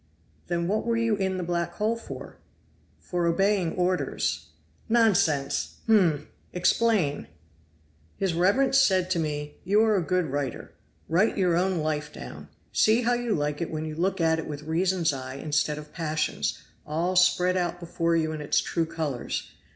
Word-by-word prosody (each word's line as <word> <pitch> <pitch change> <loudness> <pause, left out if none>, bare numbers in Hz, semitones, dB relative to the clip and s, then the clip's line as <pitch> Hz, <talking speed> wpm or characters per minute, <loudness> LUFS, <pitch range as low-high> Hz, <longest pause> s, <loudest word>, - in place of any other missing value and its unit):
"Then 170 -1 -1
what 210 +3 0
were 230 0 0
you 230 -2 +2
in 190 -2 -1
the 180 - -2
black 170 0 -2
hole 220 +2 0
for?" 230 - -9 0.6
"For 175 -1 -2
obeying 195 0 +2
orders." 180 0 -1 0.4
"Nonsense! 185 -12 +2
hum! 175 -10 +3 0.3
Explain." 180 -4 +1 0.9
"His 195 -3 0
reverence 205 +11 +3
said 185 -7 +3
to 175 - +1
me, 150 -2 -3
'You 205 +4 +3
are 220 -1 +3
a 190 - +2
good 180 +1 0
writer; 140 -3 -4 0.3
write 185 +9 +2
your 180 -3 +2
own 180 -1 +1
life 150 -1 -2
down. - - -9 0.3
See 225 +3 +4
how 245 +1 +2
you 240 -3 0
like 150 +1 -2
it 170 - -2
when 155 0 -4
you 155 - -5
look 185 +4 -1
at 160 -1 +2
it 160 - -5
with 150 -1 -6
reason's 170 +1 +1
eye 130 -1 -6
instead 150 +1 0
of 150 0 -10
passion's, 155 - -1 0.3
all 170 +5 -1
spread 180 0 +4
out 175 -1 -1
before 170 -1 -1
you 160 -1 +1
in 155 -1 -5
its 150 0 +2
true 165 -1 -1
colors. 155 -6 -4
175 Hz, 165 wpm, -26 LUFS, 155-195 Hz, 0.9 s, See